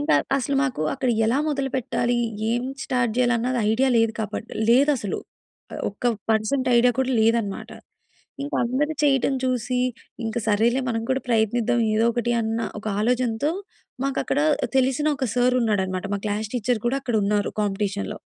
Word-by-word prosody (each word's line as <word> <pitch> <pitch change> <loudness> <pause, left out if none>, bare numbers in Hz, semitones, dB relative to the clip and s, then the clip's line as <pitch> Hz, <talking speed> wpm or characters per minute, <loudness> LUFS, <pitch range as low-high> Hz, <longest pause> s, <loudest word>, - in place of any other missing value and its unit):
ఇంకా 290 +2 +2 0.2
అసలు 275 +1 -1
మాకు 250 - -1
అక్కడ 255 - 0 0.2
ఎలా 245 +5 +2
మొదలు 275 -2 -1
పెట్టాలి? 240 -1 0 0.3
ఏం 240 +1 0 0.2
స్టార్ట్ 240 -3 0
జేయాలి? 245 -1 +3
అన్నది 250 +2 -1
ఐడియా 260 +4 +2
లేదు 225 -1 +2
కాబట్టి 215 +1 -5 0.2
లేదసలు. 260 -5 +3 0.5
ఆహ్, - - -5
ఒక్క 205 +5 -15 0.3
పర్సెంట్ 225 +5 +1
ఐడియా 245 +1 +4
కూడా 265 0 +1
లేదన్నమాట. 225 -3 0 0.7
ఇంకా 285 - -3
అందరు 280 +6 0
చేయడం 270 -1 +3
చూసి 250 -1 0 0.5
ఇంక 225 +1 -4
సరేలే 230 +5 +3
మనం 225 -1 -1
కూడా 265 0 +1
ప్రయత్నిద్దాం, 230 +1 +2
ఏదో 220 +1 +3
ఒకటి 240 0 0
అన్న 225 +1 -1 0.2
ఒక 215 - -11 0.2
ఆలోచనతో 250 +4 +1 0.5
మాకక్కడ 275 0 -1 0.4
తెలిసిన 265 +3 +1
ఒక 265 - -1
సార్ 250 +1 +3
ఉన్నాడన్నమాట. 190 -4 0
మా 200 - -3
క్లాస్ 210 +1 -2
టీచర్ 245 -1 0
కూడా 270 +3 +1
అక్కడున్నారు 210 -4 0
కాంపిటీషన్‌లో. 200 0 -2
240 Hz, 150 wpm, -24 LUFS, 220-260 Hz, 0.7 s, ఐడియా